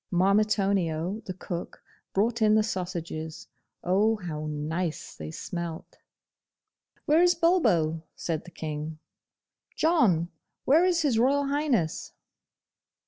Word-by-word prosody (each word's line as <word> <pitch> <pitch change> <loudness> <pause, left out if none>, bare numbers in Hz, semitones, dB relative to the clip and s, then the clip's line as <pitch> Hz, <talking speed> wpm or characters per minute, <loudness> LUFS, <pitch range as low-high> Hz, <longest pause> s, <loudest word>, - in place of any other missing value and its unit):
Marmitonio 195 -1 +1
the 185 - -4
cook 175 -1 -6 0.3
brought 230 +4 0
in 215 0 +5
the 215 - +4
sausages. 170 -6 -5 0.4
Oh, 205 +5 +3
how 155 -7 -5
nice 155 +3 -3
they 75 0 -7
smelt! 170 - -6 1.1
'Where 310 +3 +4
is 355 0 +5
Bulbo?' 175 - +2
said 160 -2 -3
the - - -10
King. 155 -1 -5 0.8
'John, 210 - +3 0.4
where 310 +6 +5
is 345 -3 +2
His 255 -7 +2
Royal 275 +4 +3
Highness? 275 - 0
185 Hz, 110 wpm, -27 LUFS, 160-235 Hz, 1.1 s, in